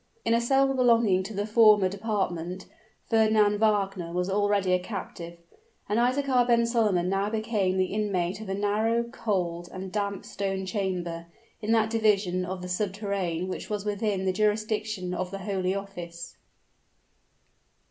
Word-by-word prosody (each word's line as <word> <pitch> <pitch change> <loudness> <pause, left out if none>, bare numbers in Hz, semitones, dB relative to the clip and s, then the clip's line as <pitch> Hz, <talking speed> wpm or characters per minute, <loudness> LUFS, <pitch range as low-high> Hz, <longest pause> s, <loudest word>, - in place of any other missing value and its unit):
In 230 - +3
a 230 - +3
cell 270 +2 +3
belonging 230 -7 +3
to 195 +4 -7
the 205 +1 -1
former 215 -3 +5
department, 190 -3 -3 0.4
Fernand 215 -2 +3
Wagner 195 -5 +1
was 180 +2 -1
already 205 -2 +2
a 180 - +3
captive; 180 -3 -7 0.5
and 210 +3 +1
Isaachar 255 0 +2
ben 235 -1 +4
Solomon 215 -7 +1
now 195 +2 0
became 215 -4 0
the 185 0 0
inmate 195 -3 -1
of 215 - -8
a 195 - -1
narrow, 215 +3 +1
cold, 180 -8 -3
and 185 0 -7
damp 200 -1 -2
stone 195 -1 -3
chamber, 180 -4 -3 0.3
in 215 +1 -1
that 220 -1 +2
division 200 -5 +2
of 180 0 -5
the - - -5
subterrane 190 -2 -2
which 185 - -5
was 210 -1 -3
within 205 -2 -1
the 185 - +1
jurisdiction 215 -2 -1
of 185 0 -3
the 195 - -5
holy 190 -1 -1
office. 175 -4 -7
200 Hz, 150 wpm, -27 LUFS, 185-220 Hz, 0.5 s, former